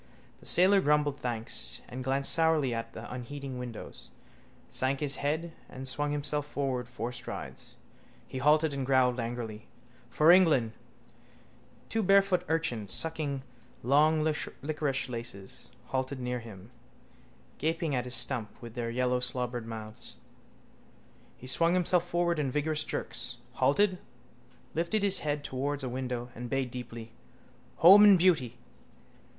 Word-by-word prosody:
The - - -6
sailor 190 +2 +5
grumbled 150 -2 +2
thanks, 110 - -2 0.2
glanced 135 +2 0
sourly 160 -6 +2
at 115 0 -5
the 115 - -8
unheeding 130 +1 -6
windows, 120 -3 -6 0.6
sank 130 +1 0
his 145 -2 -2
head 160 +4 -2 0.2
and 130 0 -7
swung 145 +3 -1
himself 145 0 -1
forward 130 -4 -2
four 125 -1 -4
strides. 125 0 -7 0.5
He 130 - -5
halted 150 +2 +3
and 140 -1 -2
growled 130 -1 +3
angrily: 115 -2 -5 0.4
—For 155 +7 +5
England... 160 -11 +5 1.2
Two 225 - 0
barefoot 195 -2 +4
urchins, 125 -11 -1
sucking 150 -4 +3 0.4
long 150 +5 +4
liquorice 150 -2 -2
laces, 115 -5 -5 0.2
halted 130 +1 -2
near 125 0 -2
him, 110 -2 -12 0.9
gaping 160 0 -1
at 125 -1 -1
his 125 0 0
stump 120 -6 0
with 120 -2 -10
their 115 -1 -3
yellowslobbered 125 -1 -1
mouths. 110 -1 -7 1.2
He - - -12
swung 165 +7 +3
himself 180 -1 +2
forward 175 -1 +1
in 140 -3 0
vigorous 150 +3 0
jerks, - - -4
halted, 185 +5 +2 0.7
lifted 170 +6 0
his 195 -2 +3
head 145 -1 -2
towards 140 +1 -3
a 130 - -2
window 125 -1 -4
and 120 +1 -7
bayed 135 -1 -1
deeply: 115 -2 -8 0.7
—_home 195 +6 +10
and 205 -2 +8
beauty. 155 -10 +2
135 Hz, 130 wpm, -30 LUFS, 125-155 Hz, 1.2 s, home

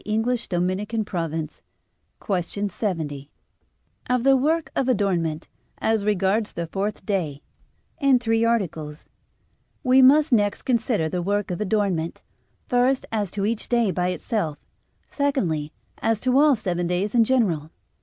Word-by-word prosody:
_______________________ 195 -6 -2 0.6
QUESTION 200 +1 -1
70 155 -9 -4 0.8
OF 250 -1 +1
THE 270 0 +5
WORK 310 +5 +1
OF 265 - +1
ADORNMENT, 175 -9 0 0.3
AS 220 -2 0
REGARDS 205 +1 +1
THE 170 - -3
FOURTH 200 +5 -4
DAY 160 -9 -2 0.6
(In 275 -3 +5
Three 225 -2 +1
Articles) 165 -10 -2 0.7
We 260 0 +5
must 290 +4 +6
next 205 -3 +2
consider 225 -8 +1
the 175 +3 -2
work 200 +2 -1
of 180 - -3
adornment, 190 -5 -1 0.4
first 250 +1 +2
as 210 -4 -1
to 200 +2 -2
each 220 +1 -2
day 235 -4 +2
by 180 0 0
itself, 180 -4 -2 0.5
secondly 185 - -1 0.3
as 225 -1 +1
to 255 0 +1
all 295 -2 +5
seven 175 -5 -2
days 180 +4 -1
in 235 -2 +5
general. 200 - +1
205 Hz, 130 wpm, -24 LUFS, 175-235 Hz, 0.8 s, must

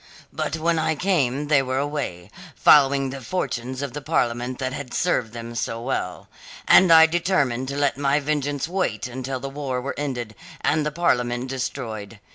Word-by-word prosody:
But 160 - -2
when 165 +1 +1
I 160 0 +1
came 150 -6 0
they 145 -2 +4
were 130 0 -2
away, 140 -12 -3 0.2
following 135 -2 +5
the 135 0 -7
fortunes 130 -3 -3
of 140 - -5
the 145 - -5
Parliament 125 -4 -1
that 130 -1 -3
had 140 -3 -6
served 125 -10 0
them 115 0 -7
so 115 0 -3
well. 115 - -3 0.4
And 185 - +7
so 165 - +8
I 160 0 +9
determined 160 -7 0
to 140 +1 -4
let 140 -1 +1
my 140 +1 +2
vengeance 145 -1 -1
wait 185 +1 -1
until 130 +1 -4
the 135 - -5
war 135 -2 -3
were 135 +3 -4
ended 125 -6 -3 0.3
and 150 +1 +1
the - - -2
Parliament 125 -6 0
destroyed. 115 -5 -5
135 Hz, 180 wpm, -23 LUFS, 125-150 Hz, 0.4 s, I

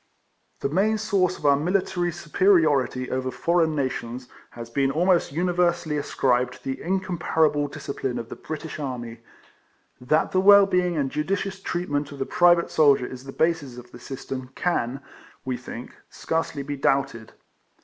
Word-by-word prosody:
The - - 0
main 205 +8 +2
source 195 -4 +1
of - - -10
our 140 -1 +6
military 175 +2 0
supe 165 -2 -9
riority 150 -9 +3
over 130 0 -1
foreign 165 +2 +1
nations 125 -3 -3 0.2
has 115 -1 -9
been 135 +3 0
almost 175 +4 +2
universally 175 -1 0
ascribed 125 -4 0
to - - -16
the 135 0 -4
incomparable 170 -5 0
discipline 140 -3 -4
of 115 - -6
the - - -7
British 155 0 -7
army. 120 -5 -5 0.8
That 155 +6 +1
the 185 - +2
well 200 +1 +8
being 180 -3 0
and 135 -3 -1
judicious 190 +5 -2
treatment 150 -7 -2
of 140 - -9
the 135 - -2
private 175 -1 +3
soldier 140 -5 +4
is 130 +1 -9
the 135 - -7
basis 145 -5 -1
of 125 0 -12
this 120 - -13
system 130 -1 -6
can 135 -7 -1 0.4
(we 130 -1 -1
think) 125 -1 -9 0.2
scarcely 160 -3 -3
be 145 +1 -5
doubted. 135 -5 0
150 Hz, 160 wpm, -24 LUFS, 130-175 Hz, 0.8 s, well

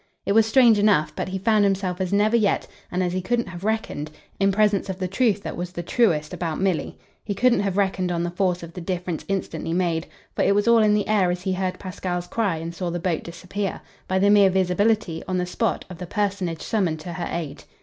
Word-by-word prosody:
It - - 0
was 220 +1 +5
strange 230 -2 +5
enough, 200 -7 +3
but - - -3
he 190 +1 -3
found 215 +2 +3
himself 190 -2 0
as 185 - -1
never 210 +3 +3
yet, 215 -4 +2 0.3
and 180 +1 0
as 175 -1 -1
he 185 - -1
couldn't 235 +3 -1
have 180 0 -9
reckoned, 215 -8 -2 0.3
in 195 0 +3
presence 205 -1 +2
of 190 - -3
the 185 -1 -2
truth 205 +1 +1
that - - -5
was 175 +1 -5
the 175 -1 -5
truest 165 -8 +1
about 165 -3 -3
Milly. 190 -3 -1 0.3
He 205 - -3
couldn't 250 +3 +3
have 195 -1 -1
reckoned 190 -2 +1
on 170 -1 -1
the 175 - -2
force 180 -1 0
of 170 0 -9
the 180 - -7
difference 175 -1 -3
instantly 165 -4 -3
made 170 -2 0 0.3
for - - 0
it 200 - +3
was 205 +2 +1
all 235 0 +6
in 210 -1 +4
the 210 - 0
air 205 -4 +3
as 180 0 -2
he 190 - 0
heard 185 0 -2
Pasquale's 180 -2 -4
cry 200 -3 0
and 165 +1 -5
saw 175 0 -3
the 175 +1 -3
boat 170 -2 -1
disappear 185 +3 -5 0.3
by 185 - 0
the 200 +2 +4
mere 200 -2 +6
visibility, 190 -1 +1
on 185 - -1
the 180 - 0
spot, 180 - -1
of 180 -3 -10
the 180 - -6
personage 195 -5 -2
summoned 180 -8 0
to 175 +2 -6
her 175 0 -4
aid. 165 -4 -5
185 Hz, 240 wpm, -24 LUFS, 175-205 Hz, 0.3 s, all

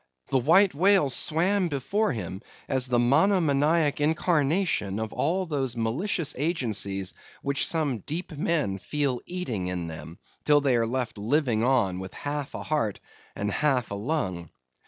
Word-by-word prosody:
The 135 - +2
White 180 +9 +5
Whale 180 -2 +4
swam 180 +8 +3
before 170 +9 0
him 95 -5 -5 0.3
as 130 -2 +1
the 125 -1 +1
monomaniac 150 +2 +3
incarnation 155 - +1
of 110 -1 -4
all 185 +3 0
those 135 -7 -2
malicious 145 - -1
agencies 105 - -1 0.3
which 140 0 0
some 150 -8 -1
deep 165 - -5
men 150 -10 -1
feel 140 0 -1
eating 125 - -3
in 90 -2 -3
them, 80 +1 -8 0.3
till 150 -1 +5
they 140 -3 +2
are 115 -1 +1
left 125 -3 -3
living 115 0 +1
on 120 -8 +2
with 95 0 -8
half 145 -1 -4
a - - -5
heart 145 -10 -1 0.4
and 105 +1 -2
half 135 -5 +1
a - - -2
lung. 100 - -3
140 Hz, 150 wpm, -26 LUFS, 110-160 Hz, 0.4 s, White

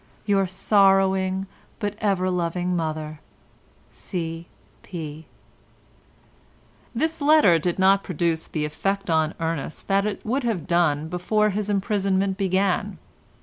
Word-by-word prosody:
—Your 195 -2 +2
sorrowing 190 0 +2 0.3
but 205 -2 -2
ever 190 -3 +1
loving 180 0 -1
mother, 155 -2 -3 0.7
C. 165 -2 -5 0.3
P." 160 -3 -8 1.7
This 320 +5 -1
letter 285 - +5
did 175 +2 -1
not 195 +1 +4
produce 170 -2 -1
the 150 -2 -2
effect 195 +5 -2
on 160 -1 +1
Ernest 165 -2 -4
that 195 +1 +2
it 205 - -5
would 255 +5 -1
have 220 -9 -1
done 160 -4 +1
before 210 +5 +1
his 205 +1 -3
imprisonment 195 -1 0
began. 195 +1 0
190 Hz, 115 wpm, -24 LUFS, 165-200 Hz, 1.7 s, letter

